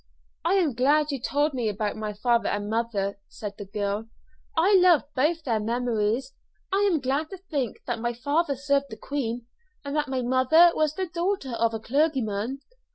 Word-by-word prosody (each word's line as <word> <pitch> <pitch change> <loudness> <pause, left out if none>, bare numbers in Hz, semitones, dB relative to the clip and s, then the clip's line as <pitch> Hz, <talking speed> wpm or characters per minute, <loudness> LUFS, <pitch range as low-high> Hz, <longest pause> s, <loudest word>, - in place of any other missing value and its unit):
"I - - +2
am 340 -8 +2
glad 290 +5 +3
you 275 - -2
told 290 +4 0
me 240 -4 0
about 210 0 -2
my 215 -1 -4
father 235 +3 +1
and 205 0 -2
mother," 205 -4 -1
said 205 -2 -6
the 205 - -6
girl. 205 +2 -2 0.5
"I 380 +5 +5
love 360 -4 +6
both 310 +5 +1
their 230 -6 0
memories. 235 +2 -1 0.4
I 405 +1 +3
am 325 - +2
glad 275 +4 -1
to 385 - -7
think 290 - -4
that 240 -2 -2
my 240 +1 -1
father 285 +5 0
served 280 +1 +1
the 220 - -8
Queen, 245 -4 -3 0.4
and 280 +1 -3
that 300 -1 +1
my 260 -2 -2
mother 260 +8 +5
was 310 -1 +1
the 380 - -1
daughter 350 -4 -2
of 230 -1 0
a - - -3
clergyman. 260 -2 0
260 Hz, 185 wpm, -26 LUFS, 225-305 Hz, 0.5 s, love